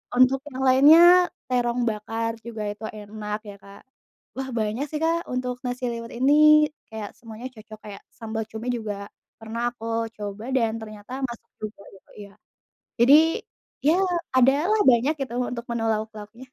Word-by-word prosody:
untuk 255 +2 +5
yang 260 - -7
lainnya 285 +6 +7 0.5
terong 245 -1 0
bakar 225 +2 -3
juga 225 -2 -6
itu 210 +2 -11 0.2
enak 210 0 -5
ya 200 - -9
Kak, 200 0 -14 0.5
wah 265 0 -4
banyak 220 +6 -1
sih 300 - -3
Kak 330 +1 +2
untuk 250 0 -2
nasi 250 +1 -4
liwet 230 0 -7
ini 275 +3 +4 0.6
kayak 215 -2 -6
semuanya 230 +1 -9
cocok, 215 -1 -13
kayak 200 - -9 0.2
sambal 220 0 -3
cumi 225 +3 -6
juga 215 -2 -4 0.5
pernah 225 +1 -6
aku 230 -2 -11 0.3
coba 205 +1 -6
dan 230 -3 +2
ternyata 215 +1 -11 0.2
masuk 235 -1 -11
juga 215 -1 -7
gitu 190 - -21 0.2
iya, - - -19 0.7
jadi 265 +5 +7 0.7
ya 325 +6 +4 0.4
adalah 295 - +4
banyak 250 +4 +3
gitu 260 -3 -4 0.2
untuk 235 -1 -6
menu 235 -1 -2
lauk-lauknya. 215 +1 -5
230 Hz, 155 wpm, -24 LUFS, 215-255 Hz, 0.7 s, lainnya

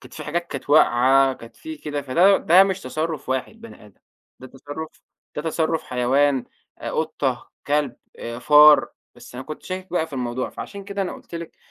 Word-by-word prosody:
كانت - - -15
في 155 - -8
حاجات 170 +3 -2
كانت 140 -1 -7
واقعة، 135 -2 +5
كانت 115 -2 -13
في 320 0 -8
كده، 145 - -5
فده 175 +9 +4
ده 180 +4 +6
مش 190 -1 -2
تصرف 155 +1 -4
واحد 130 - -3
بني 230 - -13
آدم 100 - -22 0.4
ده 130 - -9
تصرف 145 +4 -8 0.5
ده 150 - -3
تصرف 160 0 -1
حيوان، 130 +2 +1 0.3
آآ - - -5
قطة، - - -2 0.2
كلب، 145 -4 0 0.2
آآ، 115 0 -6
فار. 150 +3 +7 0.3
بس - - -15
أنا 130 +1 -7
كنت 155 - -8
شاكك 185 0 -6
بقى 165 -2 0
في 155 - -20
الموضوع، 125 -1 -3
فعشان 200 -1 -8
كده 200 0 -3
أنا 180 - -4
قُلت - - -12
لِك 170 -1 -7
150 Hz, 190 wpm, -22 LUFS, 130-170 Hz, 0.5 s, فار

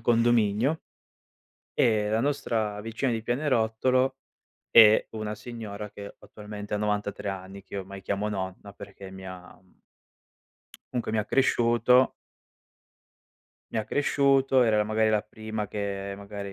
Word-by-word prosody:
condominio, 115 +4 +2 0.9
e 105 -2 +2
la 110 +1 +1
nostra 115 -7 -1
vicina 115 +4 -2
di 115 -1 -2
pianerottolo 130 0 +1 0.6
è 110 -2 +7
una 110 -1 -4
signora 105 -2 -7
che 100 0 -9
attualmente 105 -1 -8
ha - - +1
93 105 -1 -2
anni, 95 +1 -8
che 95 - -13
io 100 - -2
ormai 95 0 -9
chiamo 100 +1 -2
"Nonna", 95 0 -5
perché 95 -1 -11
mi 95 0 -10
ha, 90 -1 -10
mhmm 95 - -30 1.1
comunque, 120 -3 -2
mi 110 - +1
ha 105 - 0
cresciuto 125 0 +3 1.6
mi - - 0
ha 110 - -1
cresciuto, 135 -2 +3
era 110 -2 +3
la 105 - +3
magari 110 +1 +2
la 105 -1 +2
prima 110 0 -5
che 100 -1 -4
magari 100 -1 -7
105 Hz, 140 wpm, -27 LUFS, 100-120 Hz, 1.6 s, è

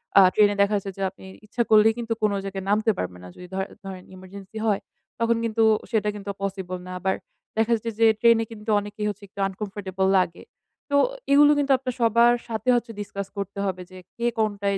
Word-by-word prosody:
অ্যা 195 - +9
ট্রেনে 205 -1 +5
দেখা 200 +1 +3
যাচ্ছে 200 -1 -3
যে - - -6
আপনি 190 0 -16 0.2
ইচ্ছা 235 +3 -1
করলেই 220 +1 +6
কিন্তু 230 -1 -2
কোন 210 - +3
জায়গায় 195 -1 -5
নামতে 215 +2 +3
পারবেন 90 0 -4
না। - - -9
যদি 180 - -11
ধরে 190 +1 -2 0.2
ধরেন 190 -1 -7
ইমার্জেন্সি 190 +3 -11
হয়, 210 -3 +1 0.4
তখন 230 0 +2
কিন্তু 225 0 +1 0.3
সেটা 210 -2 +1
কিন্তু 200 -1 -7
পসিবল 190 -2 -3
না। - - -7
আবার 190 0 0 0.4
দেখা 225 +1 +2
যাচ্ছে 230 +1 -4
যে 225 - +6
ট্রেনে 230 0 +5
কিন্তু 220 0 -8
অনেকেই 205 +1 -5
হচ্ছে 205 0 -7
একটু 200 +1 -14
uncomfortable 195 -1 -3
লাগে। 175 -2 -2 0.5
তো 285 - +1 0.4
এগুলো 290 +1 +7
কিন্তু 285 -1 +1
আপনার 255 -1 -4
সবার 235 +1 +5
সাথে 225 +1 -2
হচ্ছে 235 -1 -1
discuss 200 -1 -5
করতে 200 0 -4
হবে 185 -2 -3
যে 185 - -11 0.2
কে 235 0 0
কোনটায় 200 -2 0
205 Hz, 200 wpm, -24 LUFS, 195-225 Hz, 0.5 s, অ্যা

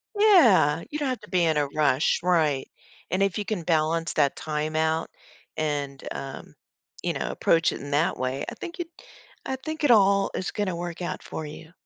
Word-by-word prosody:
Yeah, 235 - +5
you 300 - -4
don't 280 -3 0
have 255 - -2
to - - -14
be 180 -2 +2
in 160 -2 +2
a 145 -1 +1
rush, 145 0 +2
right. 155 -7 +2 0.4
And 185 +2 +1
if 195 -1 0
you 205 - -2
can 200 -5 -3
balance 165 0 +1
that 145 -3 +2
time 155 0 -3
out 160 +1 +1 0.5
and, 145 -3 -2
um, 135 -1 -7 0.5
you - - 0
know, - - -3
approach 165 -1 +2
it - - -6
in 145 - -7
that 150 +4 +1
way, 130 +2 -2
I - - -8
think 345 +2 -8
it 340 - -3 0.6
I 265 - -2
think 315 +4 -6
it 290 - +5
all 200 -3 +5
is 185 - -3
gonna 205 -4 -2
work 175 0 -5
out 175 - -4
for 160 - -6
you. 160 +2 -10
165 Hz, 200 wpm, -26 LUFS, 150-200 Hz, 0.6 s, Yeah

